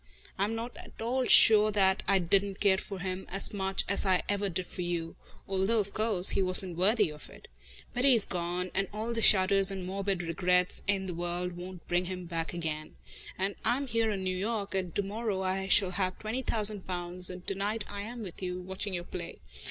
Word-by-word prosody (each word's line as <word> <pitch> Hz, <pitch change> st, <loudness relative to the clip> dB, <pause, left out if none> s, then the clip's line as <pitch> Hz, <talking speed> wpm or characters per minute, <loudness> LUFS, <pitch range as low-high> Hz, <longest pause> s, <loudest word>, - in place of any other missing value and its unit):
I 195 Hz, -, 0 dB
am 220 Hz, +2 st, -3 dB
not 235 Hz, +2 st, -6 dB
at -, -, -13 dB
all 250 Hz, +3 st, -1 dB
sure 215 Hz, -2 st, +8 dB
that 195 Hz, -2 st, +2 dB
I 195 Hz, -, +4 dB
didn't 195 Hz, +2 st, +1 dB
care 190 Hz, -2 st, +3 dB
for 200 Hz, -, -7 dB
him 185 Hz, 0 st, -5 dB
as 195 Hz, +3 st, 0 dB
much 195 Hz, -1 st, -1 dB
as 200 Hz, -, +1 dB
I 185 Hz, -2 st, +2 dB
ever 205 Hz, 0 st, -1 dB
did 185 Hz, +1 st, -3 dB
for 180 Hz, -, -7 dB
you, 170 Hz, -2 st, -3 dB, 0.3 s
although, 195 Hz, +4 st, +1 dB
of 200 Hz, -2 st, -1 dB
course, 215 Hz, -4 st, +2 dB
he -, -, +1 dB
wasn't 185 Hz, -1 st, +1 dB
worthy 200 Hz, 0 st, +2 dB
of 150 Hz, 0 st, -12 dB
it. -, -, -15 dB, 0.5 s
But 245 Hz, -, -1 dB
he's 245 Hz, -6 st, +6 dB
gone, 180 Hz, 0 st, -3 dB
and 195 Hz, -, 0 dB
all 220 Hz, +3 st, -4 dB
the 230 Hz, -, -2 dB
shudders 195 Hz, -1 st, +6 dB
and 190 Hz, -2 st, -5 dB
morbid 195 Hz, -1 st, -2 dB
regrets 180 Hz, +2 st, +1 dB
in 195 Hz, -1 st, 0 dB
the 180 Hz, -, -4 dB
world 175 Hz, +1 st, -3 dB
won't 180 Hz, 0 st, -9 dB
bring 175 Hz, +1 st, +1 dB
him 180 Hz, 0 st, -6 dB
back 165 Hz, -1 st, -4 dB
again. 155 Hz, -3 st, -5 dB, 0.4 s
And 195 Hz, +1 st, -1 dB
I 245 Hz, -, +1 dB
am 280 Hz, -, -3 dB
here 230 Hz, -3 st, 0 dB
in 195 Hz, -3 st, -3 dB
New 185 Hz, 0 st, -1 dB
York, 205 Hz, +1 st, -3 dB
and 185 Hz, -3 st, -3 dB
to 205 Hz, -, +1 dB
morrow 205 Hz, -1 st, -3 dB
I 190 Hz, +1 st, -2 dB
shall 195 Hz, -1 st, +4 dB
have 185 Hz, -1 st, -2 dB
twenty 220 Hz, +4 st, -3 dB
thousand 210 Hz, -5 st, -1 dB
pounds, 180 Hz, 0 st, +2 dB
and 180 Hz, -1 st, -9 dB
to -, -, 0 dB
night 205 Hz, +2 st, -1 dB
I 205 Hz, 0 st, -6 dB
am 230 Hz, +2 st, -7 dB
with 185 Hz, -2 st, -9 dB
you, 180 Hz, -1 st, -4 dB
watching 190 Hz, +1 st, -3 dB
your 175 Hz, -, -4 dB
play. 175 Hz, -1 st, -8 dB
190 Hz, 220 wpm, -30 LUFS, 180-205 Hz, 0.5 s, sure